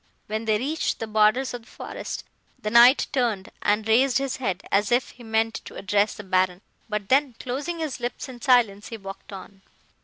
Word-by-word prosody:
"When 215 Hz, +1 st, -3 dB
they 215 Hz, -1 st, +2 dB
reached 295 Hz, +7 st, -1 dB
the 225 Hz, -, -4 dB
borders 220 Hz, +5 st, +2 dB
of 245 Hz, -, -5 dB
the 225 Hz, -, -22 dB
forest, -, -, -7 dB, 0.4 s
the 210 Hz, -, -3 dB
Knight 240 Hz, +4 st, +7 dB
turned, 230 Hz, -7 st, 0 dB
and 210 Hz, +1 st, +1 dB
raised 250 Hz, +4 st, +4 dB
his 275 Hz, -1 st, -2 dB
head, 195 Hz, -7 st, -2 dB
as 200 Hz, +2 st, +2 dB
if 245 Hz, +1 st, +2 dB
he 245 Hz, -, -17 dB
meant 225 Hz, 0 st, 0 dB
to -, -, -10 dB
address 205 Hz, +2 st, +1 dB
the 210 Hz, -, -8 dB
Baron, 185 Hz, -1 st, +1 dB, 0.3 s
but 210 Hz, -2 st, -3 dB
then, 270 Hz, -2 st, +3 dB
closing 285 Hz, +7 st, -3 dB
his 310 Hz, -6 st, -4 dB
lips 245 Hz, +3 st, -4 dB
in 250 Hz, -2 st, -10 dB
silence, 235 Hz, -7 st, +3 dB
he 230 Hz, -, -6 dB
walked 195 Hz, 0 st, -10 dB
on. 195 Hz, 0 st, -10 dB
225 Hz, 195 wpm, -25 LUFS, 205-255 Hz, 0.4 s, Knight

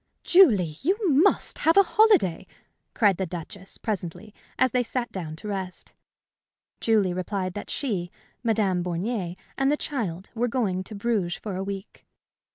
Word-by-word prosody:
"Julie! 210 Hz, -, +5 dB
you 375 Hz, +8 st, +2 dB, 0.2 s
must 405 Hz, -, +2 dB
have 325 Hz, +4 st, +3 dB
a 395 Hz, -, +9 dB
holiday!" 395 Hz, -, +3 dB, 0.5 s
cried 205 Hz, -6 st, +4 dB
the 190 Hz, -, -2 dB
Duchess, 180 Hz, +3 st, -8 dB
presently, 205 Hz, 0 st, -5 dB, 0.2 s
as 255 Hz, -1 st, +3 dB
they 250 Hz, -, +2 dB
sat 245 Hz, 0 st, -3 dB
down 160 Hz, -5 st, -5 dB
to 210 Hz, +7 st, -8 dB
rest. 190 Hz, -3 st, -5 dB, 0.9 s
Julie 210 Hz, -5 st, +2 dB
replied 185 Hz, 0 st, -3 dB
that 205 Hz, -, -7 dB
she, 195 Hz, -11 st, -2 dB, 0.3 s
Madame 210 Hz, -6 st, +1 dB
Bornier, 180 Hz, +1 st, -2 dB, 0.2 s
and 270 Hz, +1 st, +3 dB
the 295 Hz, -, +2 dB
child 200 Hz, -, -4 dB
were 240 Hz, +1 st, 0 dB
going 210 Hz, -7 st, -1 dB
to 215 Hz, -, -8 dB
Bruges 200 Hz, -5 st, 0 dB
for 205 Hz, -4 st, -6 dB
a 190 Hz, -, -2 dB
week. 195 Hz, +1 st, -7 dB
200 Hz, 155 wpm, -26 LUFS, 185-245 Hz, 0.9 s, a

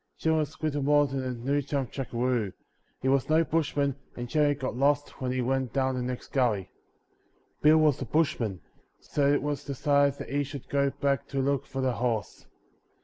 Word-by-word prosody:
Jim 160 Hz, 0 st, +1 dB
was 155 Hz, 0 st, -2 dB
little 145 Hz, -2 st, 0 dB
more 145 Hz, +1 st, +4 dB
than 135 Hz, -1 st, -3 dB
a 130 Hz, -, -2 dB
new 135 Hz, +4 st, -1 dB
chum 140 Hz, -1 st, -2 dB
jackaroo; 120 Hz, -4 st, -1 dB, 0.5 s
he -, -, +1 dB
was 135 Hz, +1 st, +2 dB
no 160 Hz, +1 st, +5 dB
bushman 145 Hz, -4 st, 0 dB, 0.2 s
and 120 Hz, 0 st, -5 dB
generally 145 Hz, +1 st, +2 dB
got 130 Hz, -3 st, -4 dB
lost 145 Hz, +2 st, +1 dB
when 130 Hz, -1 st, -1 dB
he 130 Hz, 0 st, 0 dB
went 130 Hz, -1 st, -1 dB
down 130 Hz, -1 st, +1 dB
the 125 Hz, -, -2 dB
next 125 Hz, 0 st, -4 dB
gully. 110 Hz, -8 st, 0 dB, 0.9 s
Bill 155 Hz, +1 st, +6 dB
was 155 Hz, -4 st, +3 dB
a -, -, -2 dB
bushman, 120 Hz, -, 0 dB, 0.4 s
so 140 Hz, -1 st, +1 dB
it 145 Hz, -, +2 dB
was 145 Hz, -1 st, -2 dB
decided 140 Hz, 0 st, +2 dB
that -, -, -7 dB
he 145 Hz, +1 st, +1 dB
should 140 Hz, -1 st, -8 dB
go 140 Hz, 0 st, +2 dB
back 140 Hz, 0 st, -1 dB
to 140 Hz, -, -3 dB
look 135 Hz, 0 st, 0 dB
for 135 Hz, -, -4 dB
the 130 Hz, -1 st, +1 dB
horse. 115 Hz, -3 st, -2 dB
140 Hz, 195 wpm, -28 LUFS, 125-145 Hz, 0.9 s, Bill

